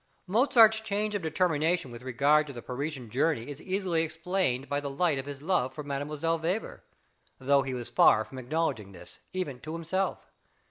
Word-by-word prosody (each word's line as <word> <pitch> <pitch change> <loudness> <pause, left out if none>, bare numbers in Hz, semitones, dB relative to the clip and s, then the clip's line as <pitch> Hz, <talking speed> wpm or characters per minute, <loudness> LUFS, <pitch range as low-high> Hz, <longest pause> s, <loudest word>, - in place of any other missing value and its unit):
Mozart's 220 +1 +5
change 210 0 -2
of 205 - -1
determination 160 -2 0
with 120 0 -9
regard 140 +4 +3
to 140 - -7
the 120 - -8
Parisian 130 -2 -5
journey 135 -2 +1
is 145 +1 -7
easily 185 -3 0
explained 160 -4 -1
by 145 0 -1
the 145 -1 -4
light 145 0 +1
of 135 - -6
his 140 0 -7
love 160 -7 0
for 150 - -5
Mdlle. 150 +3 -2
Weber, 180 +7 -3 0.6
although 140 +1 +3
he 130 -1 -3
was 120 -2 -6
far 110 - +5
from 130 +5 -9
acknowledging 125 -7 -2
this, 90 - -10
even 150 -9 -4
to 155 +4 -7
himself. 170 +4 -2
150 Hz, 180 wpm, -29 LUFS, 135-180 Hz, 0.6 s, Mozart's